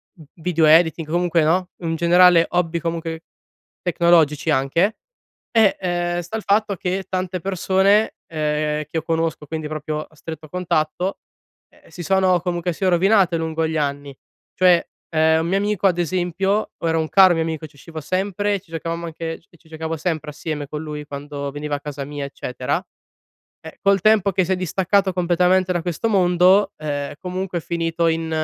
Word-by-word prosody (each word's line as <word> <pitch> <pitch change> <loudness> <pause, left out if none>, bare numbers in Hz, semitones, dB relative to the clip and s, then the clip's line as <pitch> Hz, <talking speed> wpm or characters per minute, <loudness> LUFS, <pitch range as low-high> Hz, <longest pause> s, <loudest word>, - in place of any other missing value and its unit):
v 160 - -15
video 165 -1 -1
editing 160 +1 +4
comunque 175 -1 +2
no, 180 +4 +1
in 165 -1 -2
generale 170 0 +6
hobby 170 -1 0
comunque 165 0 -4 0.6
tecnologici 165 -4 +2
anche. 160 +10 +1 0.5
E, 220 -4 +4
ehm, 175 -1 -1
sta 200 +6 -5
il 220 - -7
fatto 205 0 +1
che 185 +2 -2
tante 185 0 -2
persone, 195 +3 +2
ehm, 150 -1 -1
che 150 - -24
io 160 - -1
conosco, 165 -2 -2
quindi 155 -1 -4
proprio 155 0 -4
a 155 - -21
stretto 155 0 -9
contatto, 180 +1 -1 0.5
ehm, - - -24
si 175 - -8
sono, 190 0 +3
comunque 175 0 -2
sia, 190 +3 0
rovinate 185 -1 +3
lungo 160 0 -1
gli 160 0 -2
anni. 140 -1 -3 0.4
Cioè, 180 -2 +4 0.2
ehm, 160 0 +3
un 165 - -2
mio 190 +2 +1
amico 205 -1 +1
ad 175 -2 +1
esempio, 185 +4 -1
o 165 - -3
era 165 0 +1
un 155 - -2
caro 190 -2 +6
mio 165 - 0
amico 160 -1 -4
ci 145 - -26
uscivo 160 +2 -9
sempre, 195 +5 -1
e 195 - -3
ci 175 - -29
giocavamo 165 +1 -4
anche 165 0 -5
ci 170 0 -24
ci 160 - -25
giocavo 160 0 -4
sempre 155 -2 -3
assieme 150 -1 -5
con 150 +1 -5
lui, 150 -1 -6
quando 140 0 -6
veniva 145 +1 -5
a 145 - -6
casa 145 -2 -6
mia, 145 0 -5
eccetera 125 -2 -3 0.9
eh, 160 - -10
col 195 -1 +3
tempo 210 -1 +4
che 185 - +2
si 190 - -3
è - - +1
distaccato 190 +2 +1
completamente 180 +1 +2
da 175 - -1
questo 175 +6 -2
mondo, 185 +1 +4
ehm, 145 -2 -4
comunque 185 -1 -3
è - - -10
finito 165 0 -1
in 165 0 -1
170 Hz, 180 wpm, -21 LUFS, 155-185 Hz, 0.9 s, generale